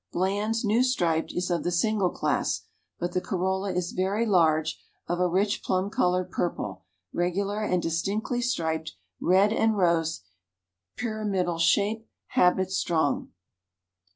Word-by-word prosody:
Bland's 205 +5 0
New 215 +4 +3
Striped 170 -11 +1
is 180 0 -2
of 170 - 0
the - - 0
single 195 +2 +1
class, - - -1 0.4
but 175 +1 -2
the 180 - -1
corolla 190 +2 -1
is 180 -1 -2
very 195 +5 0
large, 160 -6 +2 0.3
of 175 - -1
a 180 - +3
rich 200 +4 +1
plum 190 +2 -1
colored 180 -1 +1
purple, 95 - -3 0.3
regular 195 +4 -1
and 180 -4 0
distinctly 200 +9 -1
striped 160 - -1 0.3
red 195 +4 +4
and 220 -1 +2
rose, 165 - +1 0.7
pyramidal 205 -7 -1
shape, 210 +6 +2 0.2
habit 185 +1 +3
strong. 165 -6 0
185 Hz, 130 wpm, -27 LUFS, 175-205 Hz, 0.7 s, red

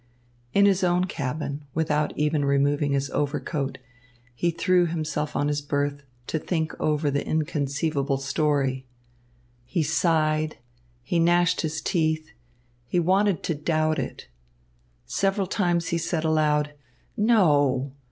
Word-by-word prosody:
In 200 0 +4
his 195 -2 +3
own 180 0 +2
cabin, 145 -2 -4
without 150 -1 +1
even 150 0 +1
removing 140 +1 +2
his 140 0 -1
overcoat, 145 -1 -2 0.6
he 170 +8 0
threw 175 +1 +2
himself 155 -2 -3
on 145 - +1
his 145 0 0
berth 145 0 -1 0.2
to 160 - -2
think 160 -1 -2
over 150 -1 +1
the 140 +1 0
inconceivable 145 -2 -1
story. 135 -1 0 0.8
He 155 +7 -1
sighed, 155 -1 +1 0.5
he 170 +7 0
gnashed 175 +1 +3
his 160 -1 -3
teeth, 160 -3 0 0.6
he 175 - +1
wanted 190 +2 +2
to 165 - 0
doubt 155 0 0
it. 130 - -5 0.8
Several 195 - 0
times 175 -3 0
he 170 - 0
said 165 -1 -1
aloud, 150 -2 +2 0.4
"No!" 145 - +3
155 Hz, 125 wpm, -25 LUFS, 145-170 Hz, 0.8 s, In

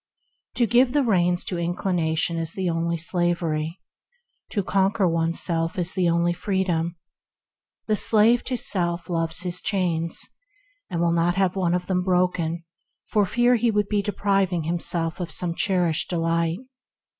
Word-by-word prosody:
To 245 - +3
give 245 +3 +3
the 290 -1 +3
reins 180 -6 +1
to 180 - -3
inclination 170 -2 -1
is 165 0 -3
the 185 -3 -1
only 170 0 -1
slavery; 170 -1 -1 0.7
to 205 - -1
conquer 195 +1 +1
oneself 165 0 0
the 180 -1 0
only 170 +1 +2
freedom. 180 -2 -1 0.9
The 215 - +1
slave 225 +3 +4
to 255 - -2
self 175 -4 -2
loves 165 0 -1
his 180 -1 -3
chains, 170 -4 -1 0.6
and 170 - -2
will 170 0 +2
not 170 +1 +1
have 190 -1 +1
one 180 -2 +1
of 180 0 -2
them 180 0 0
broken 180 -2 0 0.4
for 205 -2 +1
fear 240 +3 +3
he 235 +1 +1
should 205 -1 0
be 210 -1 +1
depriving 195 -4 0
himself 165 0 -2
of 175 -2 -4
some 170 +2 -1
cherished 175 -3 0
delight. 165 -1 0
175 Hz, 145 wpm, -24 LUFS, 170-195 Hz, 0.9 s, slave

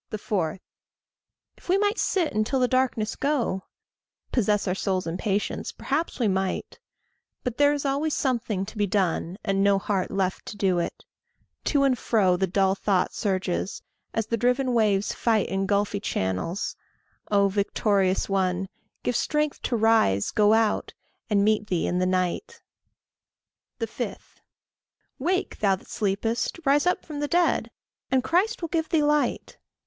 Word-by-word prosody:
4. 190 -5 -2 1.0
If - - -19
we 375 - +4
might 415 +2 +1
sit 350 -5 +1
until 215 +5 +1
the 250 - +3
darkness 255 -4 0
go, 260 -10 -1 0.7
Possess 210 -4 +1
our 180 - +1
souls 190 -1 -1
in 165 0 -3
patience 200 +1 -2
perhaps 305 +5 -2
we 235 - +2
might; 190 -1 -2 0.6
But 250 -3 -3
there 290 0 +6
is 290 -1 -2
always 285 +3 0
something 230 -8 -1
to 215 +2 -9
be 205 - +2
done, 180 -2 0
And 195 0 +1
no 200 0 +4
heart 195 -1 -1
left 190 -1 -2
to 210 - -7
do 185 -3 +2
it. 170 - -4 0.6
To 285 -2 +2
and 270 -2 +3
fro 205 -6 +2
The 190 +1 0
dull 190 +1 +2
thought 195 -1 0
surges, 190 -2 -2 0.3
as 225 - -1
the 230 +2 -1
driven 250 +2 +1
waves 210 -3 +2
fight 220 -4 +1
In 195 0 -1
gulfy 205 0 +1
channels. 95 - -2 0.5
Oh! 200 -1 +4
victorious 195 -1 +1
one, 190 -1 0 0.3
Give 245 - 0
strength 300 +3 0
to 240 - -1
rise, 220 - +3
go 210 0 +4
out, 220 -1 +1 0.3
and 200 -2 +3
meet 210 0 +2
thee 180 -4 0
in 180 - 0
the 185 - +2
night. 185 - -1 1.2
5. - - -3 1.0
"Wake, 365 +7 -1
thou 195 -2 +3
that 190 - -16
sleepest; 220 - -1
rise 285 +4 +3
up 360 - +1
from 300 -3 -6
the 290 - -1
dead, 345 +2 +2 0.4
And 260 -1 +2
Christ 365 - +1
will 335 - -2
give 320 -1 -1
thee 315 -2 +2
light." 295 0 0
210 Hz, 155 wpm, -26 LUFS, 190-265 Hz, 1.2 s, there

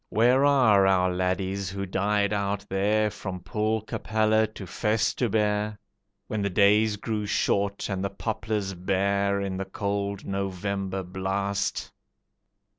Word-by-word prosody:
Where 125 +4 +4
are 115 -9 +5
our 90 -1 +3
laddies 95 +1 -1
who 100 +1 -4
died 100 +2 +1
out 100 0 -1
there, 105 +2 +1
From 95 -2 -6
Poelcapelle 110 +1 0
to 100 - -8
Festubert, 105 +1 0 0.5
When 110 - -3
the 100 - 0
days 105 +2 +4
grew 105 0 -3
short 100 0 0
and 95 -1 -3
the 100 - 0
poplars 105 -1 -3
bare 100 +2 0
In 95 -1 -3
the 95 - -3
cold 100 0 -3
November 95 0 -3
blast? 95 +2 -2
100 Hz, 120 wpm, -26 LUFS, 95-105 Hz, 0.5 s, are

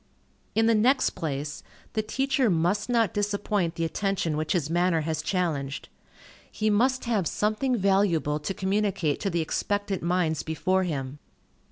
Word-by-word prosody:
In 225 +1 +4
the 230 - +4
next 245 +6 +3
place, 145 -1 -4 0.3
the 215 - +1
teacher 265 +3 +1
must 180 +6 +1
not 230 -6 +2
disappoint 205 -4 -1
the 165 - -1
attention 185 -2 -1
which 155 +1 -1
his 170 -6 0
manner 175 0 +2
has 155 0 -2
challenged. 150 -7 -2 0.6
He 215 0 0
must 255 +6 +2
have 215 -8 +1
something 215 +5 0
valuable 190 -7 +2
to 150 +6 -3
communicate 190 -5 0
to 200 - -1
the 170 -2 0
expectant 205 +4 -1
minds 170 -3 0
before 185 +4 0
him. 140 -4 -4
190 Hz, 150 wpm, -26 LUFS, 160-210 Hz, 0.6 s, In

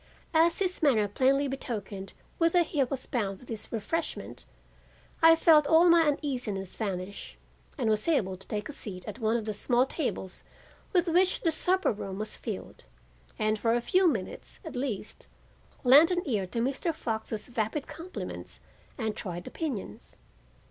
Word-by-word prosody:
As 330 +1 +4
his 370 -2 -1
manner 235 -9 +4
plainly 270 +6 +2
betokened 205 -7 -5 0.3
whither 335 +1 +4
he 300 -3 0
was 260 0 -3
bound 200 -6 -2
with 250 - -17
this 220 -2 -5
refreshment, 240 +9 -3 0.8
I 325 0 +8
felt 315 -3 +5
all 330 +2 +6
my 335 0 +7
uneasiness 245 - -2
vanish, 185 - -5 0.4
and - - -1
was 215 +3 +1
able 205 - +1
to 190 - -13
take 210 0 -3
my - - -6
seat 185 -7 -4
at 210 +3 -6
one 225 0 +2
of 225 - -4
the 215 - -2
small 245 +4 +2
tables 260 - -4 0.5
with 355 -1 +2
which 360 +3 +3
the 330 - +2
supper 370 +4 +2
room 195 -3 -5
was 215 +1 -4
filled, 210 - -7 0.5
and 215 0 +1
for 230 +1 +2
a - - +2
few 365 +10 +3
minutes, 215 - -3
at 320 - -7
least, 245 -6 -4 0.6
lend 280 +6 +8
an 360 -1 0
ear 205 -7 0
to 230 +5 -2
Mr. 280 +6 -1
Fox's 220 -4 -3
vapid 235 +5 -2
compliments 355 +3 -7 0.4
and 220 -4 -2
trite 175 -4 -5
opinions. 285 - -5
245 Hz, 160 wpm, -29 LUFS, 210-320 Hz, 0.8 s, I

